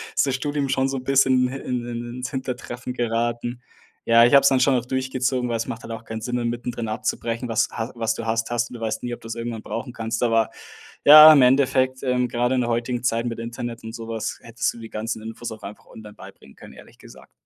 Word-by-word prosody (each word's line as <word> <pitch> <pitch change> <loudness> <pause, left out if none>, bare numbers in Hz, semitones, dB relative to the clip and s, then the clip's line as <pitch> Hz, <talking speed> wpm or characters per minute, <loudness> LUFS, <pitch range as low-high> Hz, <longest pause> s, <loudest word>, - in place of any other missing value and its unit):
ist - - +3
das 135 - 0
Studium 145 0 -2
schon 135 0 +1
so 135 - -2
'n 125 - -6
bisschen 130 -1 +3
hi 135 - -5
in 125 -1 -3
in 120 0 -5
ins 125 +2 -5
Hintertreffen 125 -2 -5
geraten. 120 0 -2 0.4
Ja, 115 0 +6
ich 120 - +2
habe 140 - +8
es - - +6
dann 130 -1 +2
schon 135 0 +4
auch 125 -1 -1
durchgezogen, 130 -1 -1
weil 115 - 0
es 115 - -3
macht 115 - -6
halt - - -8
auch 115 0 -9
keinen 110 0 -6
Sinn, 125 +2 -2
dann 120 -1 -1
mittendrin 120 -1 -4
abzubrechen, 115 +2 -3
was 115 - +2
ha 115 +1 -4
was 115 -1 -1
du 115 - -6
hast, 115 +1 -1
hast 120 0 -1
und - - -10
du 120 - -8
weißt 110 0 -3
nie, 120 -1 -3
ob - - -7
du's 115 0 -6
irgendwann 115 -1 -5
brauchen 115 +2 -5
kannst. 115 +1 -3
Aber, 115 -2 +2 0.6
ja, 155 +1 +11
im 140 - +6
Endeffekt, 130 0 +3
ähm, 125 -1 +1
gerade 125 +2 0
in 125 - +1
der 120 - -1
heutigen 120 +1 -2
Zeit 115 -1 0
mit 115 -1 -4
Internet 115 0 -6
und 110 0 -8
sowas 115 -1 -5
hättest 115 0 -2
du - - -13
die 115 - -9
ganzen 110 0 -4
Infos 115 +1 -7
auch 110 - -9
einfach 100 +1 -10
online 105 -1 -12
beibringen 70 - -14
können, - - -13
ehrlich - - -16
gesagt. - - -16
120 Hz, 250 wpm, -23 LUFS, 115-125 Hz, 0.6 s, ja